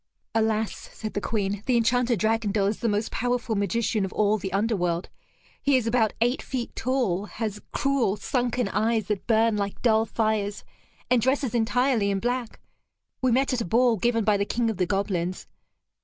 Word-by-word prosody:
"Alas," 220 -1 -1
said 215 -1 -6
the 205 - -2
Queen, 205 -2 -1
"the 250 -2 +3
Enchanter 240 +1 +2
Dragondel 215 -1 +1
is 205 +2 -1
the 230 - 0
most 210 +1 -1
powerful 245 -1 -1
magician 210 +1 0
of 190 - -3
all 210 0 +2
the 190 0 -4
underworld. 185 -4 0 0.5
He 280 -2 +3
is 250 - -1
about 230 -2 +2
eight 245 +3 +2
feet 250 -3 -5
tall, 230 -7 0
has 210 -1 -5
cruel 275 -8 +1
sunken 245 -1 -1
eyes 220 +1 +1
that 205 -3 -2
burn 225 -1 +3
like 200 -1 -3
dull 220 -2 +3
fires, 215 -2 -1 0.5
and 250 -2 +4
dresses 260 0 +1
entirely 240 -1 +2
in 195 -1 0
black. 245 +1 -2 0.6
We 255 -1 +2
met 265 +3 +2
at 245 - 0
a - - -2
ball 235 +5 +3
given 230 +2 +1
by 205 0 +3
the 200 - +1
King 230 +1 0
of 215 - -7
the 180 -2 +1
Goblins. 185 -2 -1
220 Hz, 180 wpm, -26 LUFS, 205-240 Hz, 0.6 s, and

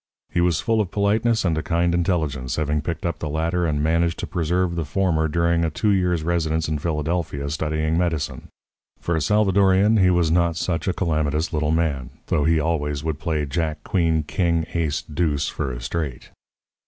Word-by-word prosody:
He 85 - +1
was 85 -2 +2
full 115 -2 +2
of 100 - -3
politeness 110 +2 +1
and 85 -3 +2
a - - -2
kind 85 -1 +1
of 85 - +2
intelligence, 75 -8 -1
having 75 -1 0
picked 85 +2 -4
up 85 - -2
the 75 - -3
latter 85 +3 0
and 75 -2 0
managed 85 +1 +1
to - - -4
preserve 90 +1 0
the 85 - -1
former 80 +1 +1
during 85 +1 +1
a 80 - +1
two 105 +7 0
years' 90 -4 +1
residence 80 -1 0
in 75 -1 -1
Philadelphia 75 -2 -2
studying 80 +1 0
medicine. 85 -4 -2 0.5
For 85 - -1
a 80 - 0
Salvadorian 100 +3 +3
he 95 -3 +5
was 85 -3 +2
not 85 -1 +2
such 85 0 -2
a 95 - +2
calamitous 80 -2 -1
little 75 -1 0
man, 75 -6 0 0.2
though 75 - +2
he 80 0 +3
always 75 -2 -1
would 80 -2 -2
play 75 -3 -1
jack, 80 +2 -2
queen, 80 -4 +1
king, 85 0 0
ace, 80 -2 -1
deuce 75 -3 -1
for 65 - -3
a - - -6
straight. 65 0 -4
80 Hz, 190 wpm, -23 LUFS, 75-90 Hz, 0.5 s, he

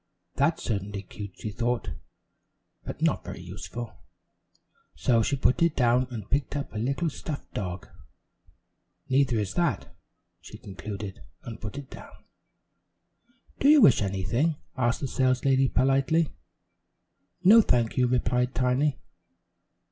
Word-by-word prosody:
"That's - - +1
certainly 100 -1 -3
cute," 100 0 -9
she 110 - -5
thought, 120 +3 -2 0.9
"but - - -6
not - - +1
very - - -7
useful," 120 -1 -8 1.0
so 115 +10 +2
she 140 +6 +1
put 130 +1 +2
it 170 -2 +3
down 125 0 +3
and 110 -5 -7
picked 140 0 -1
up 140 -4 -4
a 110 - -3
little 140 +9 -1
stuffed 145 0 -7
dog. 90 -3 -4 1.2
"Neither 130 -3 +3
is 105 -2 -2
that," 175 -1 -1 0.4
she - - -11
concluded 100 +1 -7 0.2
and 115 -2 -8
put 105 +5 -6
it 140 -2 -8
down. - - -12 1.4
"Do 275 - +4
you 305 0 +8
wish 135 - +6
anything?" 105 - 0 0.2
asked 120 -2 0
the 140 - -1
saleslady 130 +1 +2
politely. 135 +6 +2 1.1
"No, 215 +5 +8
thank 120 - +1
you," 125 -1 +3
replied 125 0 0
Tiny. 130 +2 +1
125 Hz, 130 wpm, -27 LUFS, 110-140 Hz, 1.4 s, you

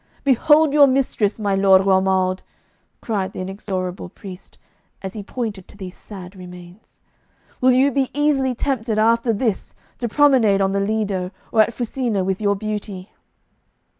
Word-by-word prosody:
'Behold 295 +3 +4
your 290 -1 +7
mistress, 255 -6 0
my 205 -2 -1
Lord 195 -1 +4
Romuald!' 190 -1 +1 0.6
cried 195 -4 -3
the - - -7
inexorable 185 -1 -5
priest, 185 0 -12 0.5
as 190 0 -5
he 215 - -6
pointed 205 -3 -5
to - - -16
these 185 -2 -8
sad 190 -2 -11
remains. 180 +1 -13 0.6
'Will 255 0 +5
you 265 +3 +3
be 270 0 0
easily 280 -3 +1
tempted 230 -4 -2
after 230 +2 +2
this 220 -2 -2 0.2
to 240 - -2
promenade 250 -7 +4
on 195 0 +1
the 200 - 0
Lido 200 -3 -1 0.2
or 220 - +4
at 215 - +2
Fusina 235 -4 -2
with 190 +2 -2
your 200 -1 +1
beauty? 205 -2 -6
210 Hz, 150 wpm, -20 LUFS, 190-245 Hz, 0.6 s, your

